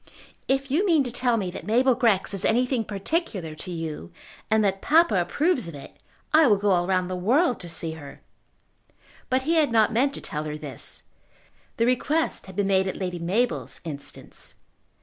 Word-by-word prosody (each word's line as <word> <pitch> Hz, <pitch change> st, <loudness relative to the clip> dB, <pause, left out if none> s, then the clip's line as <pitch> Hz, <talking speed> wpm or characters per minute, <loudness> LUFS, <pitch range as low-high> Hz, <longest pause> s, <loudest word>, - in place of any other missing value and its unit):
"If 270 Hz, 0 st, 0 dB
you 320 Hz, +8 st, +3 dB
mean 330 Hz, -8 st, +4 dB
to 250 Hz, -, -5 dB
tell 245 Hz, -1 st, +1 dB
me 190 Hz, -4 st, -2 dB
that -, -, -8 dB
Mabel 250 Hz, +4 st, +4 dB
Grex 225 Hz, -6 st, +2 dB
is 195 Hz, 0 st, -4 dB
anything 250 Hz, +1 st, +2 dB
particular 200 Hz, -, -3 dB
to 155 Hz, +4 st, -8 dB
you, 160 Hz, -, -5 dB, 0.4 s
and 220 Hz, 0 st, +3 dB
that 195 Hz, -1 st, 0 dB
papa 325 Hz, -4 st, +4 dB
approves 290 Hz, -, 0 dB
of 165 Hz, -, -8 dB
it, 140 Hz, -, -11 dB, 0.4 s
I 315 Hz, -1 st, +7 dB
will 210 Hz, -3 st, +5 dB
go 205 Hz, 0 st, +1 dB
all 175 Hz, -1 st, +2 dB
round 185 Hz, -1 st, +1 dB
the 185 Hz, -, -3 dB
world 245 Hz, -, +2 dB
to 175 Hz, -, -7 dB
see 165 Hz, -1 st, -3 dB
her." 145 Hz, -3 st, -10 dB, 1.1 s
But 260 Hz, 0 st, +1 dB
he 325 Hz, +4 st, +2 dB
had 300 Hz, -5 st, +3 dB
not 220 Hz, -1 st, +3 dB
meant 275 Hz, +5 st, +2 dB
to -, -, -7 dB
tell 150 Hz, 0 st, -4 dB
her 150 Hz, 0 st, -4 dB
this. 145 Hz, -5 st, -5 dB, 0.7 s
The 230 Hz, -, +2 dB
request 290 Hz, +5 st, 0 dB
had 190 Hz, -, -11 dB
been 205 Hz, -, +1 dB
made 190 Hz, -1 st, +2 dB
at 190 Hz, -, -3 dB
Lady 180 Hz, -2 st, -3 dB
Mabel's 210 Hz, +9 st, -1 dB
instance. 145 Hz, -4 st, -8 dB
210 Hz, 190 wpm, -25 LUFS, 180-260 Hz, 1.1 s, I